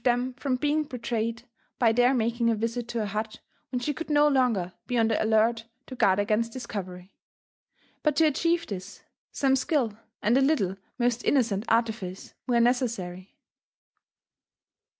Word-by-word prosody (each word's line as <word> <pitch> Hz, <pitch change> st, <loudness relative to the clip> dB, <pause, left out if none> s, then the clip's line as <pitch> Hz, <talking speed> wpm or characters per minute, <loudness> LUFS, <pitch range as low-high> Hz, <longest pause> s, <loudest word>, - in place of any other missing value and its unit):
75 245 Hz, 0 st, +3 dB
them 250 Hz, +1 st, -3 dB
from 270 Hz, -3 st, 0 dB
being 295 Hz, +3 st, +1 dB
betrayed 230 Hz, -3 st, -3 dB, 0.3 s
by 230 Hz, -3 st, +4 dB
their 245 Hz, +2 st, +4 dB
making 235 Hz, -1 st, +1 dB
a 230 Hz, -, +2 dB
visit 230 Hz, +2 st, -3 dB
to 235 Hz, -, -4 dB
her -, -, -1 dB
hut 215 Hz, +2 st, -4 dB, 0.3 s
when 250 Hz, -, -2 dB
she 295 Hz, +4 st, -2 dB
oould 330 Hz, -, -6 dB
BO 295 Hz, 0 st, +5 dB
longer 235 Hz, -10 st, +1 dB
be 245 Hz, -, -1 dB
on 225 Hz, -1 st, +4 dB
the 220 Hz, -, +1 dB
alert 225 Hz, +1 st, +2 dB, 0.2 s
to -, -, -9 dB
guard 190 Hz, -5 st, +3 dB
against 215 Hz, +3 st, +1 dB
discovery. 185 Hz, -6 st, -7 dB, 0.9 s
But 300 Hz, -2 st, +1 dB
to 320 Hz, -, +4 dB
achieve 335 Hz, +3 st, +1 dB
this,. 195 Hz, 0 st, -8 dB, 0.3 s
some 270 Hz, -1 st, +2 dB
skill 260 Hz, -5 st, 0 dB, 0.3 s
and 220 Hz, +4 st, +3 dB
a 270 Hz, -, +4 dB
little 265 Hz, -, +2 dB, 0.2 s
most 245 Hz, -1 st, 0 dB
innocent 225 Hz, -6 st, +1 dB
artifice 220 Hz, -5 st, -1 dB
were 240 Hz, -2 st, +3 dB
ne 235 Hz, +1 st, +5 dB
cessary. 190 Hz, -8 st, -4 dB
235 Hz, 165 wpm, -27 LUFS, 215-255 Hz, 0.9 s, BO